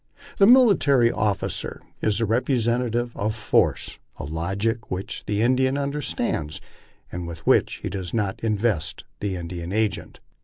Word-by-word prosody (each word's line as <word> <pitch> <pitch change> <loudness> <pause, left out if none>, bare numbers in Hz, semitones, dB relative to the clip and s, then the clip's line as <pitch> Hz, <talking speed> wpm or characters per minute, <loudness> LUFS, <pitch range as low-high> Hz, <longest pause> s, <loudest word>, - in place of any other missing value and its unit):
The 195 - +7
military 180 - +5
officer 105 -3 -2 0.2
is 105 -2 +1
the 115 - +1
representative 120 0 0
of 105 +2 -1
force, 110 - +1 0.2
a - - -6
logic 95 - -2
which 95 +1 -5
the 105 +1 +1
Indian 130 +2 +2
understands, 140 - -2 0.5
and 90 -1 -5
with 85 -1 -9
which - - +3
he - - -2
does 95 -3 -4
not 105 -4 -1
invest 105 -7 0 0.2
the 100 -2 -2
Indian 85 0 -6
agent. 110 0 -1
110 Hz, 140 wpm, -24 LUFS, 95-125 Hz, 0.5 s, The